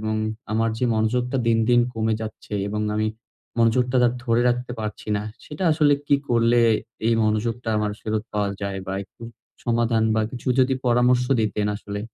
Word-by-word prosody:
এবং 110 0 -1 0.4
আমার 115 +1 +1
যে - - 0
মনোযোগটা 125 +4 0
দিন, 115 -1 +3
দিন 120 0 +5
কমে 110 0 0
যাচ্ছে 110 -1 -8 0.2
এবং 105 +1 -2
আমি 110 0 +1 0.5
মনোযোগটা 125 +2 +3
দা 120 - +5 0.2
ধরে 120 -1 +2
রাখতে 125 0 -1
পারছি 105 0 -6
না। 105 - -2 0.2
সেটা 155 +5 -5
আসলে 150 -2 +4
কি 145 - +4
করলে 120 0 +3 0.5
এই 115 - +4
মনোযোগটা 115 +2 -1
আমার 105 -1 -1
ফেরত 110 -1 -2
পাওয়া 105 -1 0
যায়? 100 -1 -3
বা 95 - -3
একটু 105 - -20 0.4
সমাধান 115 -1 +1
বা 110 - +2
কিছু 125 +1 -5
যদি 130 +1 +3
পরামর্শ 125 +1 +3 0.2
দিতেন 105 -1 0
আসলে। 105 0 -6
115 Hz, 175 wpm, -23 LUFS, 110-125 Hz, 0.5 s, দিন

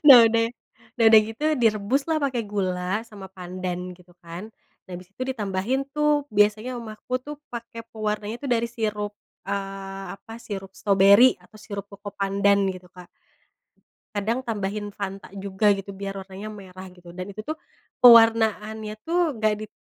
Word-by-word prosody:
Nah 270 -4 +12
udah 230 0 +2 0.5
nah 230 - +4
udah 220 -1 +9
gitu 225 +6 -9 0.2
direbus 215 +5 +2
lah 315 - +2
pake 265 -3 -1
gula 185 +1 -1
sama 205 -4 -10
pandan 180 -1 -5 0.2
gitu 180 0 -20
kan. 170 +2 -8 0.4
Nah - - -16
abis 180 +1 -9
itu 255 - -6
ditambahin 210 +2 -1
tuh 300 -1 +2
biasanya 215 +4 +3
mama 220 -2 -7
aku 250 - -5
tuh 295 - -5 0.2
pake 230 -1 -7
pewarnanya 215 0 -2
tuh 275 - -3
dari 235 -1 +2
sirup, 210 -3 -3 0.4
eee, 195 0 -4
apa, 225 - -13
sirup 195 -2 -6
stroberi 200 +5 +6
atau - - -23
sirup 200 -2 -7
cocopandan 200 0 +1 0.2
gitu 185 0 -12
Kak. 180 -1 -13 1.1
Kadang 215 +4 0
tambahin 205 -1 -3
Fanta 195 -1 -6
juga 195 +1 -1
gitu 195 +1 -7
biar 195 0 -5
warnanya 190 +2 -8
merah 190 -2 -10
gitu. 180 -1 -16
Dan 185 +2 -6
itu 200 +2 -7
tuh 310 - -2 0.5
pewarnaanya 220 -2 +6
tuh 340 +2 +1 0.2
nggak 215 -1 +2
dit - - -37
205 Hz, 155 wpm, -25 LUFS, 195-225 Hz, 1.1 s, Nah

